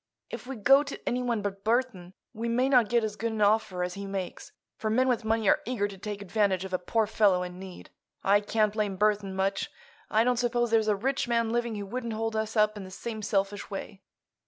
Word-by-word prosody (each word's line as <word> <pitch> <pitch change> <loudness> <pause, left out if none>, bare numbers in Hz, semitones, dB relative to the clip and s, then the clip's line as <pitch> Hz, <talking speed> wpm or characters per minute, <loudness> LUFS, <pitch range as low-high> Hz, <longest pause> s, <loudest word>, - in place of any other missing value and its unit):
If - - -7
we 270 - -5
go 270 +6 +6
to 285 -1 -6
anyone 240 -3 0
but 195 -1 -4
Burthon 220 -6 0 0.2
we 230 +1 -3
may 250 +3 +2
not 250 -6 +4
get 235 0 +2
as 215 -1 -2
good 225 +2 -2
an 220 - -4
offer 205 -3 +2
as 180 0 -3
he 200 +1 -6
makes, 195 -2 -5 0.2
for 215 - -3
men 255 +4 +3
with 245 -2 +1
money 220 -1 +1
are - - +4
eager 220 -4 -1
to 200 - -9
take 200 +1 -6
advantage 195 -2 +1
of 190 - -8
a 185 - +1
poor 220 +5 +1
fellow 200 -4 +3
in 180 0 -7
need. 190 -1 -10 0.3
I 200 +1 +5
can't 210 0 +1
blame 210 -3 -1
Burthon 205 -1 +1
much. 190 +1 0 0.4
I 220 +1 +3
don't 250 0 +2
suppose 240 -1 +1
there's 220 -1 +3
a 210 - +3
rich 265 +6 -1
man 230 -1 +1
living 235 -1 -1
who 205 -1 -4
wouldn't 235 +2 -4
hold 225 0 -2
us 220 +1 -2
up 215 0 +3
in 205 - -6
the 185 - -9
same 220 +3 -6
selfish 200 0 -1
way. 195 0 -7
215 Hz, 230 wpm, -28 LUFS, 195-235 Hz, 0.4 s, go